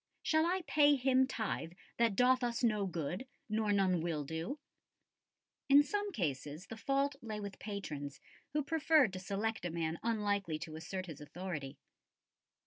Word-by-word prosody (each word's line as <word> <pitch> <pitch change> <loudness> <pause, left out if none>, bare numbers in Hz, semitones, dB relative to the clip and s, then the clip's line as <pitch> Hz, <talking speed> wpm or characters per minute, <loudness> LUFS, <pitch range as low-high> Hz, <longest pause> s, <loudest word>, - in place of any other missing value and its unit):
Shall 315 +1 +3
I 370 +1 0
pay 290 -2 +5
him 260 0 +3
tithe 220 -9 -3 0.2
that 230 -3 +3
doth 255 +3 +4
us 240 0 -1
no 210 -4 +2
good, 175 - -3 0.2
nor 215 -1 +1
none 190 -4 +3
will 160 -3 -1
do?" 160 - -4 1.1
In 285 +1 +8
some 410 +6 -2
cases 150 - -3
the 225 - -7
fault 275 +4 0
lay 215 -2 -4
with 200 -1 -6
patrons, 150 -9 -5 0.3
who 300 -1 +1
preferred 300 - +4
to 185 - -4
select 205 +3 -2
a 175 - -1
man 165 0 -2
unlikely 205 -7 0
to 155 0 -7
assert 185 +3 -5
his 160 -4 -9
authority. 150 -3 -5
205 Hz, 155 wpm, -35 LUFS, 170-260 Hz, 1.1 s, In